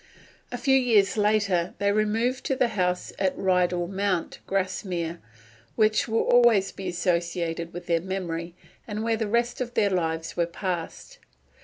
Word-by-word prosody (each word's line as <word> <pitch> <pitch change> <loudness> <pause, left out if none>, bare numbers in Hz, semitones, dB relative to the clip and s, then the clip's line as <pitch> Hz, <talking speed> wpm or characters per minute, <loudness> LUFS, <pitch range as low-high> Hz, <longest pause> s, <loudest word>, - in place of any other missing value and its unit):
A 245 - -3
few 265 +2 +3
years 225 -7 +3
later 205 -4 +1
they 200 0 +1
removed 225 +5 0
to 270 - 0
the 250 -2 +2
house 180 -4 -1
at 190 -1 0
Rydal 180 -2 +1
Mount, 195 -2 -2
Grasmere, 185 -3 -2 0.6
which 215 +1 +2
will 225 0 +1
always 235 -5 +4
be 190 - -7
associated 170 -1 -1
with 175 0 -8
their 170 -1 +1
memory, 175 -2 -4 0.3
and 215 0 -3
where 225 0 +1
the 220 -1 -2
rest 235 +4 0
of 245 -1 -4
their 200 -1 +2
lives 165 -3 -2
was 170 -1 +1
passed. 185 - -5
195 Hz, 155 wpm, -26 LUFS, 175-220 Hz, 0.6 s, always